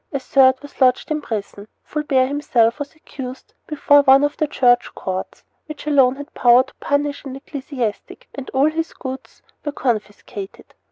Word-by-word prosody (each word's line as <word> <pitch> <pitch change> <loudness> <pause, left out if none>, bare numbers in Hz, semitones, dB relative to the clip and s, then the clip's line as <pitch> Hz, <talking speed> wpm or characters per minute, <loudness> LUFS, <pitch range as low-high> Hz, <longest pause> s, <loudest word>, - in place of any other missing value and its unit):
A 275 - -2
third 260 0 +4
was 285 -1 -14
lodged 255 +3 +3
in 305 0 -1
prison. 205 -4 -6 0.2
Fulbert 280 -4 0
himself 250 -4 +1
was 290 +2 -6
accused 265 -4 -9
before 290 -1 +4
one 270 0 +6
of 290 0 0
the 310 - 0
Church 245 -3 +2
courts, 185 0 -5 0.2
which 305 -1 -9
alone 270 -4 +4
had 285 +1 -10
power 245 +1 +5
to - - -19
punish 285 0 -1
an 270 -2 -7
ecclesiastic, 265 -5 -5
and 275 -2 -8
all 270 +3 +2
his 325 +1 -3
goods 260 0 -8 0.2
were 295 - -3
confiscated. 210 -5 -5
270 Hz, 165 wpm, -20 LUFS, 245-290 Hz, 0.2 s, one